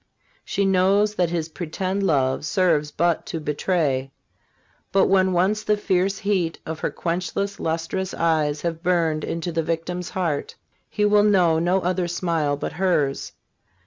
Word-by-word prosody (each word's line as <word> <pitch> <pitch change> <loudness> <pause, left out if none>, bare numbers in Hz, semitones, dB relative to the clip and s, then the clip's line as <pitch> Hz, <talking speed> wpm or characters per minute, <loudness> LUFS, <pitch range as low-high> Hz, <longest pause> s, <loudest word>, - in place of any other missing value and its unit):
She 200 - -1
knows 195 +2 +3
that 180 -5 +1
his 165 -2 -2
pretended 185 +4 -3
love 135 -8 +1
serves 160 -3 +1
but 170 +2 0
to 165 - -4
betray. 150 -3 0 0.8
But 195 - +4
when 190 -1 +3
once 190 +4 +1
the 210 -1 +1
fierce 195 -1 0
heat 185 -5 0
of 160 0 -5
her - - -1
quenchless, 185 +3 -3
lustrous 165 +4 -2
eyes 155 -3 +1
has 170 -1 -1
burned 165 -3 0
into 170 +1 -3
the 165 0 0
victim's 170 +2 -3
heart, 170 -6 -2 0.3
he 210 - 0
will 210 0 +5
know 180 -6 +4
no 180 +3 +1
other 180 0 0
smile 165 -4 -1
but - - -4
hers. 155 -6 0
175 Hz, 150 wpm, -23 LUFS, 160-190 Hz, 0.8 s, will